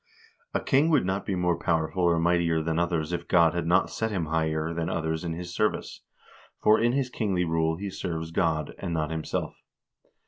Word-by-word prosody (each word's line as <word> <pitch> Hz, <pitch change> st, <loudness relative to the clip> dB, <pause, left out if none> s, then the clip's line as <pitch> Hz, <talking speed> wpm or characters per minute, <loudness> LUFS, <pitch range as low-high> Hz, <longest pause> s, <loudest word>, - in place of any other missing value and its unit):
A -, -, +3 dB
king 145 Hz, +4 st, +3 dB
would 145 Hz, -, +3 dB
not 95 Hz, +2 st, -2 dB
be 95 Hz, -, 0 dB
more 90 Hz, -1 st, 0 dB
powerful 80 Hz, +1 st, 0 dB
or 85 Hz, -1 st, +3 dB
mightier 85 Hz, -1 st, +2 dB
than 80 Hz, +1 st, 0 dB
others 85 Hz, -1 st, -1 dB
if 85 Hz, 0 st, -3 dB
God 85 Hz, -2 st, +4 dB
had 85 Hz, -1 st, -2 dB
not 90 Hz, +2 st, +3 dB
set 110 Hz, -, -1 dB
him 95 Hz, -6 st, -2 dB
higher 80 Hz, 0 st, -1 dB
than 85 Hz, 0 st, -2 dB
others 80 Hz, 0 st, -2 dB
in 85 Hz, -1 st, -3 dB
his 85 Hz, +1 st, -6 dB
service; 105 Hz, +3 st, -1 dB, 0.6 s
for 105 Hz, +1 st, +5 dB
in 120 Hz, +2 st, +2 dB
his 130 Hz, -2 st, 0 dB
kingly 95 Hz, -7 st, 0 dB
rule 80 Hz, 0 st, +1 dB
he 100 Hz, +1 st, -5 dB
serves 80 Hz, -3 st, -4 dB
God, 80 Hz, -3 st, 0 dB
and 85 Hz, -3 st, -3 dB
not 80 Hz, 0 st, -1 dB
himself. 80 Hz, -1 st, -3 dB
85 Hz, 200 wpm, -27 LUFS, 80-95 Hz, 0.6 s, for